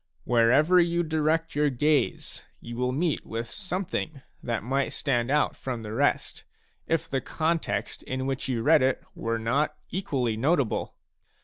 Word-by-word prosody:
Wherever 130 +9 +4
you 170 0 +2
direct 160 +1 0
your 150 0 +2
gaze, 145 +3 0 0.2
you 120 0 -8
will 125 +1 0
meet 155 +3 0
with 115 +1 -5
something 180 -7 -3 0.2
that 115 -3 -2
might 135 +3 0
stand 120 -4 0
out 150 +1 +2
from 125 -4 -5
the 105 0 -6
rest, 140 +5 0 0.4
if 165 -1 0
the 135 -1 -1
context 165 +1 -1
in 130 0 -3
which 135 +1 -2
you 120 -3 -1
read 155 +3 +6
it 130 0 +1
were 115 0 -2
not 120 +7 0 0.2
equally 135 - -1
notable. 140 +1 0
140 Hz, 150 wpm, -27 LUFS, 120-160 Hz, 0.4 s, read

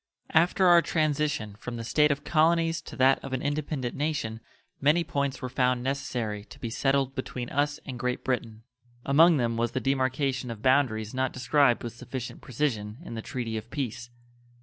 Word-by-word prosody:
After 175 +4 +4
our 175 -1 +7
transition 150 -8 0
from 125 - -6
the 115 - -5
state 150 +6 +3
of 140 0 -1
colonies 165 +1 +2
to - - -10
that 135 0 +4
of 135 - -6
an 130 - -2
independent 145 -3 -2
nation 135 -7 -2 0.4
many 150 +5 +3
points 140 -4 -2
were - - -1
found 125 -1 +1
necessary 120 -6 -2
to - - -14
be 115 - -5
settled 135 +1 +1
between 130 -2 -5
us 145 +1 0
and 125 -3 -6
Great 125 0 -2
Britain. 115 -3 -3 0.4
Among 160 +4 +6
them 115 -3 0
was 120 0 0
the 130 - 0
demarcation 130 -1 0
of 115 -2 -7
boundaries 125 -5 +2
not 130 0 -1
described 130 -1 +3
with 120 - -5
sufficient 125 +1 -7
precision 115 -6 -2
in - - -8
the 110 - -4
treaty 115 -2 -4
of 110 +1 -7
peace. 125 -3 -4
130 Hz, 180 wpm, -27 LUFS, 120-145 Hz, 0.4 s, our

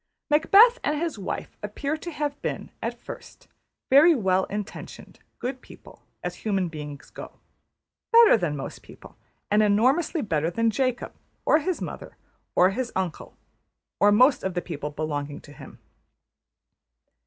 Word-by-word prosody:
Macbeth 405 +11 +6
and 300 - 0
his 325 -9 -3
wife 190 - -5
appear 275 +9 -3
to 320 +2 -7
have 295 -2 -4
been, - - -4
at - - -4
first, - - -11 0.4
very 310 +5 +7
well 190 -5 +1
intentioned, 205 -1 -8 0.2
good 255 +1 -5
people, - - -16 0.2
as - - -4
human 195 -5 -1
beings 150 -2 -9
go; - - -9 0.8
better 465 -1 +8
than 175 -9 -1
most 135 - -7
people; - - -15 0.4
and 210 +1 +4
enormously 260 - +2
better 160 -5 0
than 230 +5 +1
Jacob, 255 0 -1 0.3
or 305 - +5
his 345 +3 -2
mother, - - -8 0.4
or 185 +2 +5
his 250 +4 -3
uncle, 185 -4 -4 0.6
or 205 +3 +5
most 255 +6 +4
of 190 -1 -3
the 175 - 0
people 150 -3 -5
belonging 145 -1 -4
to 145 - -15
him. - - -13
215 Hz, 145 wpm, -25 LUFS, 175-295 Hz, 0.8 s, better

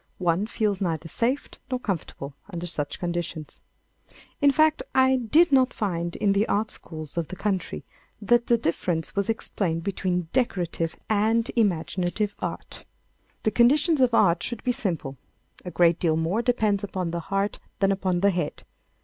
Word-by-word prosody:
One 180 +3 +1
feels 210 -4 -1
neither 165 -3 -1
safe 245 - 0 0.2
nor 255 -1 -1
comfortable 165 - -4 0.2
under 175 -2 -5
such 150 -4 -2
conditions. 170 -3 -4 0.8
In 285 0 +6
fact, 310 +2 +3
I 260 0 +5
did 295 +8 +4
not 260 -1 +4
find 170 -4 -2
in 200 - +2
the 200 +2 +2
art 215 +2 0
schools 155 -1 -8
of 165 -2 -1
the 185 - -7
country 190 - -2 0.4
that 235 +3 +2
the 235 - +4
difference 165 -3 -1
was 200 +1 0
explained 175 -6 -1
between 180 -3 -1
decorative 175 -9 0
and 220 +2 +2
imaginative 195 0 0
art. - - -5 0.6
The 215 - +2
conditions 290 +6 +4
of 250 -1 +4
art 175 -6 +4
should 240 -3 -4
be 250 - +2
simple. 165 - -3 0.5
A - - -3
great 170 -1 +3
deal 160 -3 +2
more 170 +8 0
depends 215 -4 +1
upon 185 -4 -3
the 170 - -2
heart 195 +1 0 0.2
than 195 0 +2
upon 185 -2 0
the 200 0 +4
head. 175 -5 -3
195 Hz, 160 wpm, -25 LUFS, 170-230 Hz, 0.8 s, In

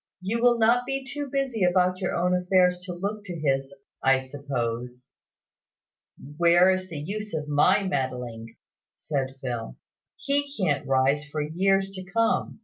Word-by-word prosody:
"You 210 +6 -2
will 240 -1 +5
not 235 +2 +3
be 270 0 -3
too 285 0 -5
busy 270 -7 -1
about 180 0 +2
your - - -1
own 180 +1 +2
affairs 180 0 +3
to 180 - -5
look 200 +4 -4
to 175 -4 -6
his, 135 -2 0 0.3
I 135 0 +4
suppose." 125 -2 -5 1.3
"Where 175 +2 +5
is 185 0 -2
the 165 - -6
use 205 +6 -5
of 150 -1 -3
my 165 +7 +3
meddling?" 125 -9 -3 0.4
said 135 -3 -3
Phil. 120 - -4 0.4
"He 285 0 -1
can't 150 -8 0
rise 135 +2 +2
for 150 0 -4
years 195 +5 +1
to 190 -1 -7
come. 225 +3 0
180 Hz, 150 wpm, -26 LUFS, 135-195 Hz, 1.3 s, will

